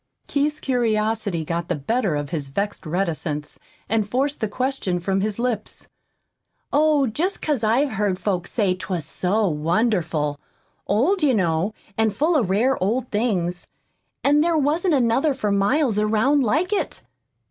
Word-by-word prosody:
Keith's 295 +1 0
curiosity 220 - 0
got 170 +1 -2
the - - 0
better 195 - 0
of 145 0 -4
his 150 -5 -3
vexed 200 +4 -3
reticence, 155 -4 -2 0.3
and 215 -1 0
forced 275 +5 -1
the 220 - +1
question 250 -5 -1
from 190 +2 0
his 210 0 -1
lips. 235 -3 -3 0.8
"Oh, 300 -1 +4
just 325 - -1
'cause 290 -7 -1
I've 250 +6 +2
heard 200 -3 0
folks 185 -3 -2
say 200 -6 +1
'twas 185 -4 -4
so 205 +3 0
wonderful 160 -3 0 0.5
old, 280 - +2
you 280 -5 +3
know, 175 +1 0 0.2
and 220 -2 +2
full 315 +9 +2
of 235 -11 +2
rare 230 +7 +2
old 240 +7 0
things, 185 -6 -1 0.6
and 295 +2 +4
there 335 -1 +2
wasn't 310 +4 +2
another 265 +3 +2
for 210 -6 -1
miles 210 +4 +2
around 220 +7 +2
like 315 - +1
it. 410 - -2
215 Hz, 150 wpm, -23 LUFS, 185-270 Hz, 0.8 s, Oh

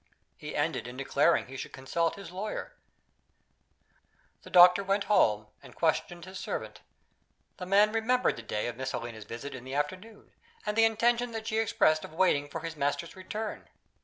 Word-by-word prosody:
He - - -8
ended - - -1
in 125 +1 -8
declaring 140 +4 +2
he 130 - -11
should - - -7
consult 165 +6 -1
his 195 -4 -10
lawyer. 195 +4 -5 1.7
The - - -13
doctor 180 +2 +8
went 195 +1 +1
home, 110 - +3 0.2
and - - -14
questioned 175 0 0
his 185 0 -8
servant. - - -5 0.8
The 180 - -6
man 205 +2 +5
remembered 230 +3 +2
the - - -8
day 105 -1 -3
of 120 0 -4
Miss 130 0 -3
Helena's 115 -3 -6
visit 120 +6 -7
in 130 -2 -8
the 130 +1 -6
afternoon, 185 +9 -4 0.3
and 210 0 -1
the 225 0 +6
intention 235 +2 +2
that 220 -1 -5
she 220 0 0
expressed 155 -8 +2
of - - -9
waiting 145 -5 +2
for - - -5
his 165 -1 -5
master's 145 +3 -2
return. 210 +3 -6
175 Hz, 175 wpm, -29 LUFS, 135-210 Hz, 1.7 s, doctor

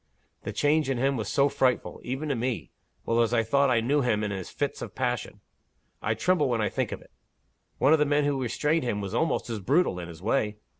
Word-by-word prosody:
The - - -5
change 150 -1 +2
in 135 - 0
him 135 +3 +1
was 110 -5 -3
so 140 0 +3
frightful 130 -3 0
even 135 +5 -3
to 140 - +1
me, 120 0 -3 0.3
well 115 +1 +2
as 115 +1 +2
I 115 - +3
thought 140 +5 +2
I 120 -2 +3
knew 140 +5 +2
him 110 -4 +1
in 105 - -2
his 95 -2 -5
fits 145 -1 -3
of - - -7
passion 125 -2 -2 0.6
I - - 0
tremble 175 -7 +2
when 120 -2 0
I 105 - +1
think - - -2
of - - -5
it. - - -24 0.7
One 145 - +4
of 160 - +4
the 150 - +4
men 145 0 +2
who 145 - +2
had 130 - -1
restrained 150 +7 0
him 110 -4 -1
was 100 0 -5
almost 160 +7 0
as 110 - -3
brutal, 130 - +1
in 85 - -6
his 85 -2 -10
way. 105 +1 0
125 Hz, 245 wpm, -27 LUFS, 115-145 Hz, 0.7 s, One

